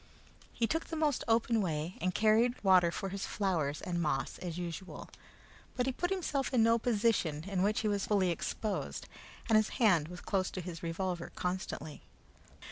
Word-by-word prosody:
He 230 - 0
took 325 +7 -1
the 325 - -5
most 305 -4 +1
open 225 0 +3
way, 165 -1 -2
and 185 +1 0
carried 225 +3 +3
water 185 -3 +6
for 195 +3 -4
his 195 +1 -4
flowers 165 -8 -1
and 175 -1 -1
moss 145 -4 -1
as 175 -2 -5
usual; 175 +1 -6 0.7
but 250 - +1
he 265 - +1
put 355 +7 -2
himself 320 -8 -1
into 245 -4 +4
no 230 +1 +4
position 210 -10 +1
in 190 0 -2
which 210 +3 +2
he 220 - 0
was 205 -1 0
fully 195 -4 +3
exposed, 205 +5 -3 0.4
and 225 -2 +5
his 215 0 +3
hand 180 - +4
was 180 +1 -8
close 190 -2 -1
his 180 -2 -5
revolver 175 +1 -3
constantly. 180 -4 -4
195 Hz, 175 wpm, -32 LUFS, 175-225 Hz, 0.7 s, water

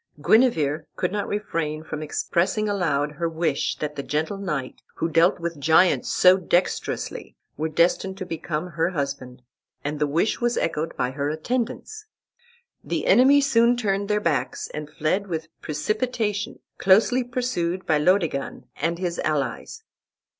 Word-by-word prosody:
Guenever 155 - +3
could 180 - -1
not 205 0 -2
refrain 165 -7 -3
from 155 -1 -6
expressing 185 +7 0
aloud 155 -8 0
her 165 +2 -2
wish 160 -3 -1
that 150 -1 -4
the 140 - -3
gentle 155 +8 -2
knight, 150 -10 -4
who 165 - -1
dealt 165 +3 +3
with 170 -2 -4
giants 160 +5 +4
so 185 0 +6
dexterously, 180 0 -1 0.2
were 160 +2 -2
destined 180 +4 +1
to 185 - -5
become 165 0 -4
her 165 +2 0
husband, 140 -6 -4 0.4
and 145 0 -3
the 150 - +2
wish 165 +12 0
was 240 0 +1
echoed 160 0 -2
by 125 - 0
her 140 +1 -2
attendants. 250 - -3 0.8
The - - -2
enemy 275 +3 +6
soon 240 -3 +3
turned 200 -3 -1
their 210 0 +2
backs 150 -10 -1
and 150 0 -6
fled 185 +8 -1
with 160 -3 -4
precipitation, 210 - -2 0.2
closely 225 +6 +4
pursued 240 -8 -2
by 155 -2 +2
Laodegan 165 -4 0
and 170 +3 -1
his 175 -1 -3
allies. 145 -5 -2
170 Hz, 145 wpm, -24 LUFS, 150-205 Hz, 0.8 s, so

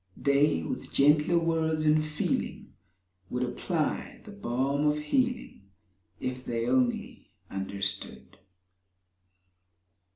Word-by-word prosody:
They, 140 - +3
with - - -5
gentler 150 +4 +4
words 160 -2 +1
and 155 0 +4
feeling, 155 0 -2 0.6
Would 125 0 -1
apply 150 +6 -2
the 210 - -9
balm 140 -5 0
of 150 0 +2
healing— 235 - -1 0.5
If 130 0 -4
they 115 -2 -2
only 125 -1 0 0.2
understood. 100 +1 -4
145 Hz, 95 wpm, -29 LUFS, 125-155 Hz, 0.6 s, gentler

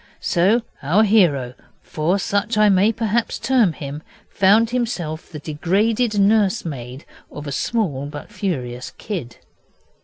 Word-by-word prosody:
So 200 +7 +2 0.2
our 175 +10 +3
hero, 165 - +3 0.3
for 165 +5 0
such 205 +3 -1
I 215 0 +5
may 195 +3 +4
perhaps 225 +1 -1
term 250 -8 +2
him, 145 +1 -7 0.3
found 215 +4 +4
himself 180 -11 -3
the 160 - -8
degraded 205 - 0
nursemaid 185 - 0 0.3
of 150 - -8
a 145 - -5
small 145 - -1
but 145 +6 -9
furious 130 -12 -4
kid. 165 - -6
190 Hz, 125 wpm, -21 LUFS, 150-215 Hz, 0.3 s, I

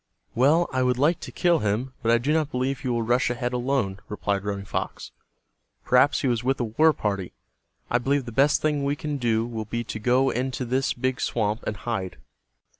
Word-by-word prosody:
"Well, 150 +8 +4
I 130 - +1
would 125 -1 +2
like 150 +6 +2
to - - -8
kill 175 -2 +2
him, 110 +5 -1
but 115 -2 +2
I 115 - +5
do 135 +6 0
not 155 -2 +1
believe 130 0 -1
he 130 - -5
will 120 -2 0
rush 120 +3 +2
ahead 120 0 -2
alone," 120 -6 -1
replied 100 -1 -2
Running 100 -1 -3
Fox. - - -4 0.7
"Perhaps 125 +3 +4
he 140 - 0
was 120 -2 0
with 135 +1 0
a - - +1
war 135 +9 +4
party. 100 - -3 0.6
I 120 - +3
believe 135 +2 0
the 120 - -6
best 145 +5 +3
thing 150 -2 +1
we 140 +1 0
can 150 0 -4
do 115 -3 +1
will 115 -2 -5
be 120 +2 -3
to 110 - -6
go 125 +4 +2
into 130 +1 -2
this 130 +3 0
big 130 +1 -2
swamp 110 -1 -1
and 105 - -2
hide." 95 -4 -4
125 Hz, 210 wpm, -25 LUFS, 115-135 Hz, 0.7 s, I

